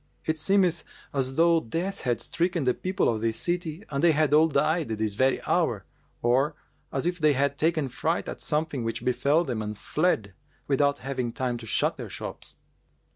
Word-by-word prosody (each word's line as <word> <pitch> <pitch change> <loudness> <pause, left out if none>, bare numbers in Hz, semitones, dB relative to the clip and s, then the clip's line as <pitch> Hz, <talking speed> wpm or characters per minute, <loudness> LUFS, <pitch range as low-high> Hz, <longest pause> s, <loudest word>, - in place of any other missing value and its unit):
It 160 0 -1
seemeth 185 -2 +2 0.3
as 135 -1 -1
though 165 +1 +5
Death 175 - -3
had 120 -2 0
stricken 170 -2 -1
the 125 -1 +3
people 185 +6 0
of 110 -2 0
this 115 0 0
city 175 0 -2
and 140 +1 -1
they 170 -2 +6
had 155 -1 +2
all 155 +2 +6
died 160 +2 +1
this 110 -2 -1
very 130 +5 +2
hour, - - +1 0.4
or 135 +6 +2 0.4
as 135 - -1
if 175 +1 -1
they 155 -2 +4
had 140 +1 +1
taken 155 -1 +1
fright 160 +6 -1
at - - -6
something 150 -4 -1
which 115 0 -3
befel 140 +6 +2
them 120 -8 -3
and 105 0 -5
fled, 135 - 0 0.3
without 140 0 +2
having 130 -3 -2
time 125 0 -2
to 115 -1 -10
shut - - +1
their - - -6
shops.' - - -7
145 Hz, 185 wpm, -27 LUFS, 125-165 Hz, 0.4 s, they